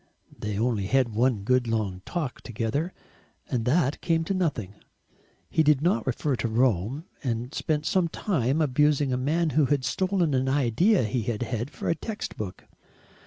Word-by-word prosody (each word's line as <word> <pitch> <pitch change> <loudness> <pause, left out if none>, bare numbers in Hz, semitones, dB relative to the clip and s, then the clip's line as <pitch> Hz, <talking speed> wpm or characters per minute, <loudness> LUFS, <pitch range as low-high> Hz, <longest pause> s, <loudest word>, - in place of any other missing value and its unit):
They 105 -1 -4
only 110 -3 0
had 130 +1 +3
one 115 -2 +1
good 125 +2 +2
long 105 -5 -1
talk 155 -8 -3
together, 120 - -2 0.6
and 120 -3 0
that 145 +1 +2
came 165 -2 +1
to 180 - -1
nothing. 150 - -1 0.7
He - - +2
did 150 -3 +4
not 135 -10 +1
refer 130 +2 0
to 115 - -1
Rome, 120 - +1 0.2
and 120 +1 -2
spent 150 -1 -1
some 180 0 +2
time 160 - 0
abusing 145 -1 +2
a - - +2
man 155 +5 +1
who 150 -1 +3
had 140 -1 +1
stolen 185 -5 +1
an 130 0 +1
idea 145 - +3
he 115 +3 -1
had 110 +1 -2
had 120 +2 -3
for - - -6
a - - +3
text 215 +5 -5
book. 95 -3 -6
130 Hz, 170 wpm, -26 LUFS, 115-155 Hz, 0.7 s, did